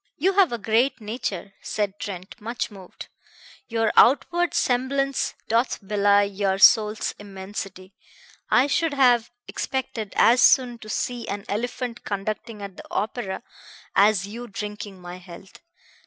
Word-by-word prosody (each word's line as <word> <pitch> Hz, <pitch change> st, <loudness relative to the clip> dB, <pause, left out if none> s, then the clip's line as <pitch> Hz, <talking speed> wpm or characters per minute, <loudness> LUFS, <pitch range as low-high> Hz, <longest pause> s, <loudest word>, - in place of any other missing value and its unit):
"You 380 Hz, +6 st, +2 dB
have 385 Hz, -5 st, +4 dB
a 235 Hz, -, -2 dB
great 235 Hz, +5 st, +1 dB
nature," 210 Hz, -4 st, -5 dB
said 205 Hz, -1 st, -3 dB
Trent, 185 Hz, -1 st, -6 dB
much 230 Hz, +1 st, -4 dB
moved. 190 Hz, -3 st, -11 dB, 0.6 s
"Your 225 Hz, -1 st, 0 dB
outward 345 Hz, +7 st, +4 dB
semblance 270 Hz, +2 st, 0 dB
doth 235 Hz, +3 st, +1 dB
belie 205 Hz, 0 st, +4 dB
your 200 Hz, -1 st, -1 dB
soul's 215 Hz, +1 st, +5 dB
immensity. 195 Hz, -1 st, -8 dB, 0.6 s
I 250 Hz, -, +5 dB
should 295 Hz, +1 st, 0 dB
have 245 Hz, -4 st, +4 dB, 0.2 s
expected 230 Hz, -5 st, -4 dB
as 245 Hz, +2 st, +5 dB
soon 245 Hz, -3 st, +4 dB
to 215 Hz, -, -11 dB
see 240 Hz, +1 st, -3 dB
an 200 Hz, 0 st, -4 dB
elephant 235 Hz, +2 st, -4 dB
conducting 210 Hz, +2 st, -4 dB
at 195 Hz, -2 st, -8 dB
the -, -, -10 dB
opera 210 Hz, -2 st, -3 dB, 0.5 s
as 200 Hz, -1 st, +4 dB
you 235 Hz, +4 st, -8 dB
drinking 205 Hz, -2 st, -7 dB
my 180 Hz, 0 st, -8 dB
health. 180 Hz, +1 st, -13 dB
215 Hz, 135 wpm, -24 LUFS, 200-245 Hz, 0.6 s, soul's